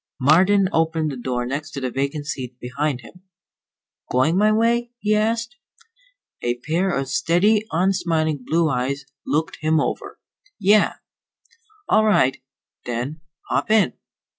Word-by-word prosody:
Marden 185 Hz, +8 st, +4 dB
opened 160 Hz, -1 st, +1 dB
the -, -, -5 dB
door 125 Hz, -1 st, -3 dB
next 145 Hz, +5 st, -4 dB
to 140 Hz, -, -4 dB
the 130 Hz, -2 st, -3 dB
vacant 140 Hz, +3 st, -2 dB
seat 125 Hz, -4 st, -5 dB
beside 140 Hz, +1 st, -2 dB
him. 180 Hz, +8 st, -15 dB, 0.9 s
"Going 130 Hz, +7 st, +2 dB
my 210 Hz, +3 st, +4 dB
way?" 235 Hz, +2 st, +1 dB
he 215 Hz, -2 st, 0 dB
asked. 225 Hz, +1 st, 0 dB, 0.8 s
A 120 Hz, 0 st, 0 dB
pair 170 Hz, +7 st, 0 dB
of 135 Hz, -6 st, -1 dB
steady, 175 Hz, +10 st, +2 dB
unsmiling 165 Hz, -5 st, 0 dB
blue 165 Hz, +5 st, +1 dB
eyes 135 Hz, 0 st, -2 dB, 0.2 s
looked 155 Hz, +2 st, -1 dB
him 155 Hz, 0 st, +2 dB
over. -, -, -3 dB, 0.4 s
"Yeah." 205 Hz, +2 st, +4 dB, 0.9 s
"All 215 Hz, -, +4 dB
right, 135 Hz, -13 st, +3 dB, 0.5 s
then. 125 Hz, +6 st, -4 dB, 0.3 s
Hop -, -, 0 dB
in." 215 Hz, -, +4 dB
155 Hz, 135 wpm, -22 LUFS, 135-200 Hz, 0.9 s, Marden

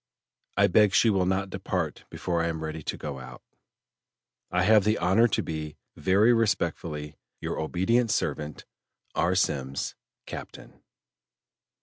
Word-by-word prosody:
I -, -, +6 dB
beg 100 Hz, +1 st, +4 dB
she 115 Hz, -, +5 dB
will 95 Hz, -2 st, +1 dB
not 95 Hz, +1 st, 0 dB
depart -, -, -3 dB
before 85 Hz, -2 st, -2 dB
I 85 Hz, -, 0 dB
am 80 Hz, -1 st, -3 dB
ready 80 Hz, 0 st, -4 dB
to -, -, -4 dB
go 70 Hz, -3 st, -5 dB
out. 65 Hz, -, -11 dB, 1.1 s
"I 90 Hz, +1 st, +1 dB
have 105 Hz, +1 st, +6 dB
the 105 Hz, +2 st, +2 dB
honor 95 Hz, +7 st, +4 dB
to 110 Hz, -, 0 dB
be 75 Hz, -1 st, -5 dB, 0.2 s
"Very 100 Hz, +5 st, +4 dB
respectfully, 85 Hz, -9 st, -1 dB, 0.2 s
"Your -, -, -3 dB
obedient 110 Hz, +9 st, +1 dB
servant, 75 Hz, -6 st, -2 dB, 0.5 s
"R. 90 Hz, +2 st, +1 dB
SEMMES, 70 Hz, -7 st, -1 dB, 0.3 s
"Captain." -, -, -9 dB
90 Hz, 135 wpm, -27 LUFS, 80-105 Hz, 1.1 s, I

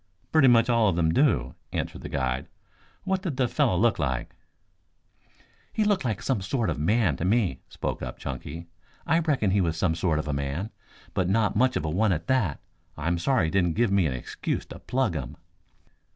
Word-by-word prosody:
"Pretty 155 Hz, -4 st, +5 dB
much 115 Hz, -2 st, +5 dB
all 115 Hz, -3 st, +3 dB
of 90 Hz, -, 0 dB
them 80 Hz, -1 st, +2 dB
do," 65 Hz, -, +2 dB, 0.2 s
answered -, -, -3 dB
the -, -, -7 dB
guide. 65 Hz, -1 st, -1 dB, 0.6 s
"What 190 Hz, -1 st, 0 dB
did 170 Hz, -9 st, -4 dB
the 130 Hz, -, +2 dB
fellow 90 Hz, -, +1 dB
look 115 Hz, +4 st, +2 dB
like?" 65 Hz, -4 st, -2 dB, 1.4 s
"He 215 Hz, -, +1 dB
looked 205 Hz, -4 st, +2 dB
like 110 Hz, -6 st, -2 dB
some 130 Hz, -7 st, 0 dB
sort 110 Hz, +4 st, -1 dB
of -, -, -3 dB
a -, -, -6 dB
man 90 Hz, -, +2 dB
to -, -, -4 dB
me," 95 Hz, -, +1 dB
spoke -, -, -4 dB
up -, -, -5 dB
Chunky. 70 Hz, +5 st, -6 dB, 0.4 s
"I 165 Hz, +3 st, +3 dB
reckon 145 Hz, -, +1 dB
he 100 Hz, +1 st, +3 dB
was 85 Hz, -2 st, 0 dB
some 85 Hz, -2 st, +1 dB
sort 80 Hz, -1 st, 0 dB
of 75 Hz, -, -3 dB
a 75 Hz, -, -1 dB
man, 70 Hz, +9 st, -3 dB, 0.4 s
but 95 Hz, -2 st, 0 dB
not 105 Hz, +1 st, +2 dB
much 130 Hz, 0 st, +3 dB
of 75 Hz, -, -1 dB
a -, -, -1 dB
one 100 Hz, +5 st, +2 dB
at 85 Hz, 0 st, -3 dB
that. 110 Hz, -, 0 dB, 0.4 s
I'm 80 Hz, +3 st, -1 dB
sorry 130 Hz, 0 st, +2 dB
he 80 Hz, -, -2 dB
didn't 90 Hz, -4 st, +2 dB
give 115 Hz, -2 st, +2 dB
me 100 Hz, -4 st, +3 dB
an 65 Hz, -, -2 dB
excuse 65 Hz, -, -4 dB
to -, -, -10 dB
plug 130 Hz, -7 st, 0 dB
him." 65 Hz, -6 st, -5 dB
95 Hz, 210 wpm, -26 LUFS, 80-120 Hz, 1.4 s, Pretty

